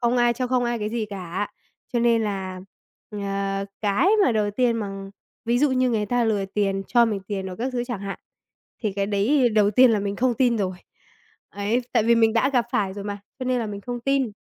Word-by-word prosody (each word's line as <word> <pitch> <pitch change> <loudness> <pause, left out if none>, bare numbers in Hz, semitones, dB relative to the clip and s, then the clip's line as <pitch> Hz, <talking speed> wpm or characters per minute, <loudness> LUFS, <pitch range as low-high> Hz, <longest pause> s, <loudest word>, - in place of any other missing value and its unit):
không 240 0 +2
ai 240 -1 +4
cho 250 +2 -2
không 250 -1 +1
ai 240 0 -1
cái 210 -1 -2
gì 225 -2 -2
cả. 190 +1 -4 0.4
Cho 240 - +1
nên 230 -1 +3
là, 190 -3 -3 0.5
ờ, 195 -1 -2 0.2
cái 205 - +2 0.2
mà 250 - +3
đầu 210 -2 +1
tiên 235 +2 +1
mà 195 -2 -5 0.3
ví 240 +1 +2
dụ 290 +1 +3
như 255 -1 +2
người 210 -3 0
ta 245 +2 +1
lừa 210 -3 +1
tiền, 195 0 -1
cho 240 -1 +4
mình 210 -4 -1
tiền 195 -2 -3
rồi 185 -1 -6
các 255 +3 -3
thứ 245 -1 -1
chẳng 240 -5 -5
hạn, 200 0 -5 0.6
thì 210 -3 0
cái 200 0 -1
đấy 240 +6 +3
đầu 210 -2 +3
tiên 250 +4 +6
là 220 - +2
mình 200 0 -3
không 250 +1 +1
tin 240 -1 +2
rồi. 185 -3 -2 0.7
Ấy, 205 +4 0
tại 230 - +3
vì 235 +2 +4
mình 225 -1 +4
đã 230 +4 +2
gặp 245 -3 +3
phải 195 -2 0
rồi 200 -1 -6
mà, 205 0 -4 0.2
cho 260 - -4
nên 255 0 +1
là 230 - -2
mình 205 -1 -6
không 245 +3 -5
tin. 270 -2 0
220 Hz, 235 wpm, -24 LUFS, 200-240 Hz, 0.7 s, tiên